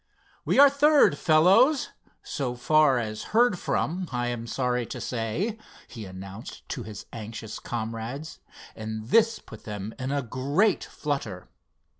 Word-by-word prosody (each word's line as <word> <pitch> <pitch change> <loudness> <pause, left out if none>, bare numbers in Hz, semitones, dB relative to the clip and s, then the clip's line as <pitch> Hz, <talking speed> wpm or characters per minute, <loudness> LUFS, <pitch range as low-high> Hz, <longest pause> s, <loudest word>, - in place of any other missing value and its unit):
"We - - +1
are 285 +1 +10
third, 280 - +5
fellows, 190 - +4 0.3
so 130 -4 -3
far 150 +1 +4
as 110 -2 -3 0.2
heard 235 -6 +4
from, 180 +2 -1
I 120 -1 -1
am 120 -1 -4
sorry 125 0 0
to 125 - -6
say," 125 - -2 0.3
he 115 -5 -8
announced 95 +3 -9
to - - -4
his 105 -1 -8
anxious 110 -1 -7
comrades, 115 +6 -5 0.4
and 110 0 -6
this 230 - +4
put 110 - -13
them 105 0 -5
in 130 +1 -3
a 140 0 0
great 140 - +1
flutter. 125 -11 -4
125 Hz, 140 wpm, -26 LUFS, 110-165 Hz, 0.4 s, are